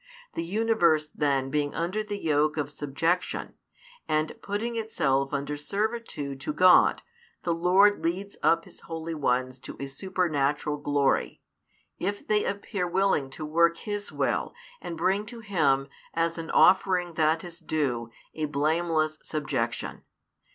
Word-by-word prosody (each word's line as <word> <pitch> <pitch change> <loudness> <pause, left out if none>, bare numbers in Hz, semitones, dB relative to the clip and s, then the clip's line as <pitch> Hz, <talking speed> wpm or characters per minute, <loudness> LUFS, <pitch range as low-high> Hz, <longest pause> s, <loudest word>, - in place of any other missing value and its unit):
The 165 - -2
universe 175 -6 +2
then 135 -3 0
being 145 -1 0
under 180 +6 -1
the 205 -1 -4
yoke 150 -3 +1
of 145 -1 -2
subjection, 165 +5 -1 0.5
and 155 0 0
putting 220 +4 -3
itself 140 -12 0
under 145 0 -2
servitude 185 - -3
to 150 - -3
God, 180 +3 +6 0.4
the 170 - +1
Lord 185 +5 +4
leads 190 +4 -2
up 165 0 +3
His - - -14
holy 165 0 -5
ones 130 -3 0
to - - -9
a 140 - -3
supernatural 150 -2 -1
glory, 145 -1 0 0.6
if 200 +3 -3
they 210 -1 +2
appear 200 -2 -2
willing 180 -6 +1
to 155 +3 -6
work 170 +2 +3
His 205 +1 -4
Will - - -1 0.3
and 165 - -6
bring 190 +5 +1
to 235 +1 -7
Him, 145 -10 +2 0.3
as 165 0 0
an 165 - -6
offering 185 -2 +4
that 160 0 +2
is 175 -1 -9
due, 140 -8 -1 0.2
a 155 - -2
blameless 155 +1 0
subjection. 135 -6 -3
165 Hz, 140 wpm, -27 LUFS, 145-185 Hz, 0.6 s, God